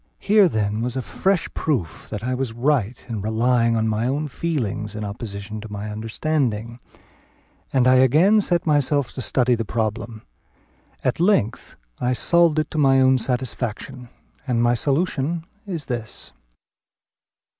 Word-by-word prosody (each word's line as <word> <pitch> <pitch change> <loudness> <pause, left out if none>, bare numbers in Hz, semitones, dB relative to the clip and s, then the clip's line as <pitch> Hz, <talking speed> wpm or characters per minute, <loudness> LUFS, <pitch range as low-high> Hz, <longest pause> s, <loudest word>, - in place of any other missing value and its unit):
Here, 205 -3 +4
then, 105 -3 -1
was 125 +1 -2
a 130 - -2
fresh 190 +5 0
proof 100 - -2
that 105 0 -5
I 130 +1 -1
was 125 -2 -2
right 125 -2 0
in 110 -4 -4
relying 115 +2 +2
on 110 0 +1
my 110 +2 0
own 145 +3 -1
feeling 120 -8 -2
in 105 -1 -4
opposition 100 0 -6
to 110 -1 -10
my 105 +1 -5
understanding; 115 0 -2 0.9
and 130 -2 +3
I 130 0 +6
again 160 - +5
set 175 -3 0
myself 145 -3 +2
to 130 - -6
study 125 0 +2
the 115 -1 0
problem; 110 0 -3 0.8
at 130 - 0
length 170 - +1 0.2
I 125 +1 +1
solved 170 +5 +3
it 155 -1 0
to 155 - -2
my 135 -2 +5
own 130 0 +4
satisfaction; 125 0 -4 0.4
and 120 -2 +1
my 120 0 +4
solution 155 +4 0 0.2
is 170 -6 -4
this. 120 -3 -6
125 Hz, 150 wpm, -22 LUFS, 110-145 Hz, 0.9 s, I